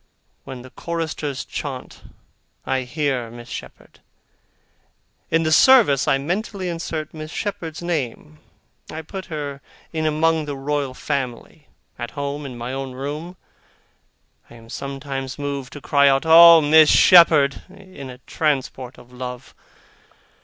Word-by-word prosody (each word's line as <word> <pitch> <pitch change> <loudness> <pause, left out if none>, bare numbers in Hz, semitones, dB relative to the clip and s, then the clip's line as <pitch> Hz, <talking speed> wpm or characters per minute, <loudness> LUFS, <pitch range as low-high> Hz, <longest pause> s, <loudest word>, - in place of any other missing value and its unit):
When 130 -2 -8
the 130 - -13
choristers 160 -4 -4
chaunt, 135 -4 -7 0.6
I 135 0 0
hear 135 -5 -1
Miss 120 +1 -12
Shepherd. - - -10 1.3
In 165 0 +2
the 155 - 0
service 195 - +5
I 135 - +3
mentally 185 +5 -3
insert 165 -2 -5
Miss 155 -1 -8
Shepherd's 170 -4 -5
name 155 -2 -4 0.5
I 160 +1 -7
put 190 +4 -7
her 145 -4 -6 0.3
in 160 -1 -1
among 160 +1 +1
the 145 -1 -5
Royal 140 -1 -2
Family. 140 +2 -5 0.3
At 120 - -4
home, 140 0 -4
in 125 -2 -9
my 120 +2 -5
own 135 -1 -5
room, 150 +7 -6 1.1
I - - -14
am 115 -1 -15
sometimes 135 -1 -5
moved 140 -3 -5
to 145 - -9
cry 140 0 +4
out, 135 +3 +1
'Oh, 165 0 +9
Miss 155 +1 +6
Shepherd!' 160 -6 +6
in 185 -8 -12
a 125 - -10
transport 135 -4 -2
of 125 0 -17
love. 125 0 -8
145 Hz, 135 wpm, -21 LUFS, 135-160 Hz, 1.3 s, Oh